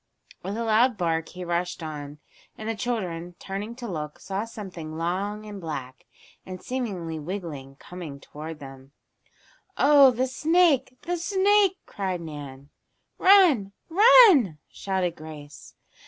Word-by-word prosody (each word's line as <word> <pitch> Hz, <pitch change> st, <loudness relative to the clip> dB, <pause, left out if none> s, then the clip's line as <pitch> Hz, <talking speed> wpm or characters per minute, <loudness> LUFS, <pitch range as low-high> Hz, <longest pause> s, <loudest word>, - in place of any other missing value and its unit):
With 200 Hz, +3 st, -5 dB
a 230 Hz, -, -2 dB
loud 225 Hz, +1 st, +3 dB
bark 165 Hz, -3 st, -1 dB
he 180 Hz, 0 st, -8 dB
rushed 175 Hz, 0 st, -2 dB
on, 150 Hz, -2 st, -7 dB, 0.4 s
and 215 Hz, -, -7 dB
the 225 Hz, -, 0 dB
children, 180 Hz, -7 st, -4 dB
turning 205 Hz, +4 st, -6 dB
to 245 Hz, -1 st, -7 dB
look, 150 Hz, -6 st, -5 dB
saw 195 Hz, +3 st, -4 dB
something 180 Hz, -8 st, -8 dB
long 195 Hz, +5 st, -2 dB
and 205 Hz, -2 st, -8 dB
black, 135 Hz, -6 st, -7 dB, 0.4 s
and 185 Hz, -1 st, -8 dB
seemingly 190 Hz, -12 st, -4 dB
wiggling, 150 Hz, -6 st, -6 dB
come 160 Hz, -2 st, -9 dB
toward 155 Hz, +3 st, -9 dB
them. 135 Hz, -1 st, -12 dB, 0.8 s
"Oh, 280 Hz, -2 st, +7 dB
the 250 Hz, +1 st, 0 dB
snake! 290 Hz, -2 st, +2 dB
The 350 Hz, +1 st, -2 dB
snake!" 390 Hz, +2 st, +3 dB
cried 190 Hz, -3 st, -3 dB
Nan. 145 Hz, -4 st, -9 dB, 0.5 s
"Run! 335 Hz, -, +5 dB, 0.2 s
Run!" 380 Hz, -, +7 dB
shouted 185 Hz, -3 st, -2 dB
Grace. 150 Hz, -2 st, -11 dB
190 Hz, 130 wpm, -25 LUFS, 160-245 Hz, 0.8 s, Oh